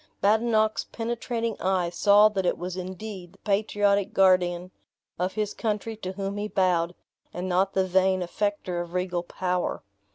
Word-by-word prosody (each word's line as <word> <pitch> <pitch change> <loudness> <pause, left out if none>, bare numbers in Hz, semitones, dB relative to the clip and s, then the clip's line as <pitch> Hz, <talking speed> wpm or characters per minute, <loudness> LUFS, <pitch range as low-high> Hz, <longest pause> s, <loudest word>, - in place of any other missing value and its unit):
Badenoch's 220 +1 +2
penetrating 230 -1 -3
eye 185 -2 +1
saw 205 +3 +6
that 195 -3 -2
it 180 - +1
was 180 +1 -5
indeed 185 0 -7
the - - -21
patriotic 205 -1 +1
guardian 185 -1 +3 0.5
of 185 +1 -1
his 210 -1 -2
country 220 0 -2
to 185 -3 -5
whom 195 +1 -4
he 205 +1 -2
bowed, 180 -4 +1 0.4
and 180 +1 -3
not 185 +2 +1
the 190 -1 +3
vain 185 0 +2
affector 185 -1 -2
of 175 +1 -8
regal 180 -1 -1
power. 180 +1 -2
190 Hz, 155 wpm, -26 LUFS, 180-210 Hz, 0.5 s, saw